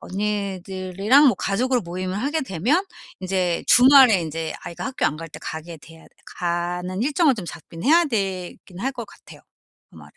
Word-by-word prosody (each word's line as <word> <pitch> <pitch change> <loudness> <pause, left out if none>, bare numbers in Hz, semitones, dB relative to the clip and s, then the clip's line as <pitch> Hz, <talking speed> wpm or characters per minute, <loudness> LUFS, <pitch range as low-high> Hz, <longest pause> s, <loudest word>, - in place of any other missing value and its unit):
언니들이랑 195 +4 0
뭐 245 - +4
가족으로 250 +5 0
모임을 185 +1 -5
하게 295 +6 -1
되면 260 - 0 0.4
인제 185 -2 -1
주말에 250 -6 +7
인제 160 0 -4
아이가 170 - -6
학교 265 - -1
안 150 - -2
갈 165 +1 -8
때 - - -11
가게 165 +1 -7
돼야 160 +2 -16 0.3
가는 180 +2 -2
일정을 290 +1 +2
좀 190 - -6
잡긴 165 +1 -10
해야 335 +5 +5
되긴 190 - -4
할 270 +2 -2
것 240 -3 -6
같아요, - - -16 0.5
아무래도. - - -16
190 Hz, 335 characters per minute, -22 LUFS, 175-255 Hz, 0.5 s, 주말에